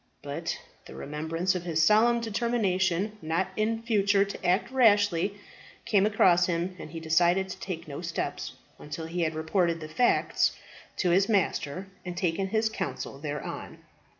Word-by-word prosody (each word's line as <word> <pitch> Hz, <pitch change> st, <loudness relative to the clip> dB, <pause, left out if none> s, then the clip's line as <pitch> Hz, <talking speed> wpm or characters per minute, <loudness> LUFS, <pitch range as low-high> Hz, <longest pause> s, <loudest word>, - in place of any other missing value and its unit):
But 155 Hz, +4 st, -4 dB, 0.3 s
the -, -, -11 dB
remembrance 160 Hz, +5 st, -2 dB
of 180 Hz, -, -3 dB
his 165 Hz, -2 st, +1 dB
solemn 230 Hz, +6 st, +4 dB
determination 210 Hz, -3 st, 0 dB
not 165 Hz, +4 st, -1 dB
in 225 Hz, +1 st, -1 dB
future 200 Hz, -3 st, +3 dB
to 200 Hz, -, -8 dB
act 185 Hz, +8 st, +1 dB
rashly, 205 Hz, -6 st, +3 dB, 0.5 s
came 210 Hz, -3 st, +3 dB
across 180 Hz, -4 st, +4 dB
him, 175 Hz, +1 st, -1 dB
and -, -, -8 dB
he 165 Hz, +1 st, -6 dB
decided 175 Hz, +4 st, +2 dB
to 185 Hz, +1 st, -7 dB
take 170 Hz, -4 st, -6 dB
no 145 Hz, +1 st, -6 dB
steps 170 Hz, -1 st, -4 dB, 0.3 s
until 150 Hz, +2 st, -6 dB
he 170 Hz, +2 st, -3 dB
had 160 Hz, -1 st, 0 dB
reported 165 Hz, +1 st, 0 dB
the 155 Hz, -, -7 dB
facts 240 Hz, +11 st, +2 dB, 0.4 s
to 180 Hz, -, +1 dB
his 195 Hz, +5 st, +3 dB
master, 190 Hz, -4 st, 0 dB, 0.2 s
and 180 Hz, -1 st, -6 dB
taken 185 Hz, +1 st, 0 dB
his 220 Hz, +3 st, +1 dB
counsel 135 Hz, -9 st, -5 dB
thereon. 150 Hz, 0 st, -6 dB
180 Hz, 155 wpm, -28 LUFS, 165-205 Hz, 0.5 s, solemn